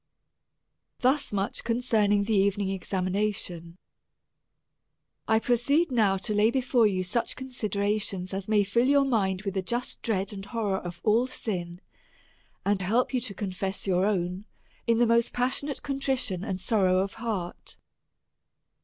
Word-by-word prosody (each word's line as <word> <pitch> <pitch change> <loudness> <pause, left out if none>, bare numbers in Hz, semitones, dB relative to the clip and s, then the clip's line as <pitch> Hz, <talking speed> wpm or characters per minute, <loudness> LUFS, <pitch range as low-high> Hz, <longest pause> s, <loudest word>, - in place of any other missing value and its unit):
Thus 270 +3 +2
much 200 -1 -2
concerning 220 -4 +2
the 220 +2 -1
evening 200 0 +2
examination, 185 -2 -2 1.5
I 220 - +4
proceed 265 +8 +2
now 210 -6 +3
to 215 - -1
lay 210 +2 +4
before 250 -2 +3
you 185 -2 0
such 205 +6 -1
considerations 205 -6 -2
as 195 0 -4
may 210 -1 +4
fill 235 +6 +2
your 280 0 +4
mind 195 -7 0
with 195 -2 -3
a - - +2
just 240 +6 -4
dread 200 -3 -1
and 195 -1 -7
horror 205 -2 -1
of 175 -1 -8
all 230 +4 +3
sin, 180 -8 -5 0.8
and 200 -1 +1
help 230 +8 +1
you 255 - +1
to 200 - -6
confess 190 0 -4
your 190 0 +2
own 185 -1 -1 0.4
in 230 -1 +4
the 240 - +4
most 235 0 +2
passionate 260 +3 -1
contrition 265 -9 -1
and 190 -3 -3
sorrow 190 -2 +2
of 195 +1 0
heart. 200 -7 -4
205 Hz, 145 wpm, -27 LUFS, 190-235 Hz, 1.5 s, I